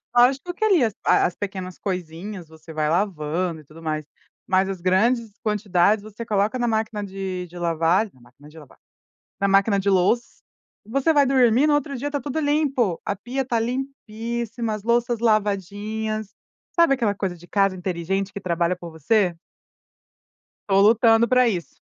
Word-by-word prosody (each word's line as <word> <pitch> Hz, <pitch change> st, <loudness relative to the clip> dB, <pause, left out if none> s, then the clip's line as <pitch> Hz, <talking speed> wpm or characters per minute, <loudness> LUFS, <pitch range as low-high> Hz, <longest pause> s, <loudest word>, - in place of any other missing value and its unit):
Lógico 270 Hz, +8 st, +3 dB
que 435 Hz, -, 0 dB
ali, 370 Hz, -10 st, +4 dB
as 220 Hz, -3 st, +1 dB
a -, -, +5 dB
a -, -, +4 dB
as 175 Hz, -, -7 dB
pequenas 185 Hz, -2 st, -6 dB
coisinhas, 180 Hz, 0 st, -5 dB
você 160 Hz, +1 st, -13 dB
vai 155 Hz, -1 st, 0 dB
lavando 170 Hz, -2 st, -1 dB
e -, -, -19 dB
tudo 155 Hz, +3 st, -15 dB
mais. 155 Hz, -1 st, -2 dB, 0.4 s
Mas 190 Hz, 0 st, +2 dB
as 190 Hz, -3 st, -5 dB
grandes 220 Hz, +5 st, +2 dB
quantidades, 210 Hz, -1 st, +2 dB
você 215 Hz, +2 st, -8 dB
coloca 210 Hz, +2 st, 0 dB
na 240 Hz, -1 st, 0 dB
máquina 220 Hz, -2 st, -1 dB
de 190 Hz, -2 st, -5 dB
de 175 Hz, +1 st, -12 dB
lavar 170 Hz, +5 st, +1 dB
na 130 Hz, -, -24 dB
máquina 130 Hz, +5 st, -18 dB
de 155 Hz, -, -16 dB
lavar 150 Hz, -4 st, -15 dB, 0.6 s
na 200 Hz, -, +2 dB
máquina 195 Hz, +1 st, +3 dB
de 200 Hz, +1 st, 0 dB
louç 190 Hz, +6 st, +3 dB, 0.7 s
você 275 Hz, +6 st, +2 dB
vai 285 Hz, -2 st, +5 dB
dormir, 260 Hz, 0 st, +4 dB
no 300 Hz, -, +3 dB
outro 285 Hz, -1 st, -2 dB
dia 275 Hz, +4 st, -3 dB
está 290 Hz, 0 st, -2 dB
tudo 285 Hz, +4 st, -3 dB
limpo. 285 Hz, -, +1 dB
A -, -, 0 dB
pia 250 Hz, +7 st, -3 dB
tá 235 Hz, -2 st, 0 dB
limpíssima, 235 Hz, -2 st, -4 dB
as 210 Hz, -1 st, -6 dB
louças 235 Hz, 0 st, +1 dB
lavadinhas. 215 Hz, 0 st, -1 dB, 0.4 s
Sabe 335 Hz, -5 st, +4 dB
aquela 230 Hz, -6 st, +1 dB
coisa 195 Hz, -3 st, -3 dB
de 175 Hz, -, -15 dB
casa 195 Hz, +1 st, +1 dB
inteligente 185 Hz, +2 st, -2 dB
que 200 Hz, -, -6 dB
trabalha 175 Hz, -2 st, 0 dB
por 175 Hz, -1 st, -9 dB
você? 175 Hz, +2 st, +1 dB, 1.3 s
Estou 195 Hz, 0 st, +4 dB
lutando 225 Hz, +2 st, +5 dB
pra 255 Hz, +1 st, +4 dB
isso. 180 Hz, -7 st, -3 dB
205 Hz, 175 wpm, -23 LUFS, 180-235 Hz, 1.3 s, a